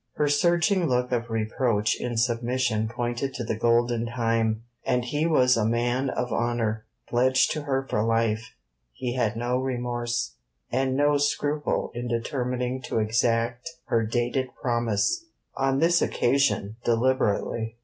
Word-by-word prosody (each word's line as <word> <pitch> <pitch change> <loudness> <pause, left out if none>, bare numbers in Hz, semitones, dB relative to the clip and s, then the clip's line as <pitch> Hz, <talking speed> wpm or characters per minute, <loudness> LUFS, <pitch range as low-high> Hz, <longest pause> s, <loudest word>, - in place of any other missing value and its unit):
Her 150 - +1
surging 170 +4 +2
look 125 -1 0
of 120 -1 -1
reproach 115 0 0
in 120 -2 -3
submission 120 -1 0
pointed 120 +3 -3
to 120 - -3
the 110 - -2
golden 120 +1 +2
time, 115 -2 0 0.2
and 125 -1 +1
as 120 - -6
he 150 +2 +1
was 125 -6 +4
a 115 - +1
man 120 +4 +1
of 125 -2 -2
honour, 115 -2 -1 0.2
pledged 130 +2 +3
to 155 - -2
her 135 -2 0
for 105 - 0
life, 115 - 0 0.4
he 120 - -3
had 115 -4 0
no 120 +2 0
remorse, 120 - -2 0.3
and 130 0 0
no 145 0 +3
scruple 145 +1 0
in 120 +1 -4
determining 125 +2 -2
to 120 - -3
exact 115 +4 0 0.2
her 115 -1 +2
dated 120 +3 -1
promise, 120 - 0 0.3
on 135 0 +1
this 170 +3 +3
occasion 120 -5 +1
deliberately. 115 -2 0
120 Hz, 145 wpm, -26 LUFS, 115-130 Hz, 0.4 s, was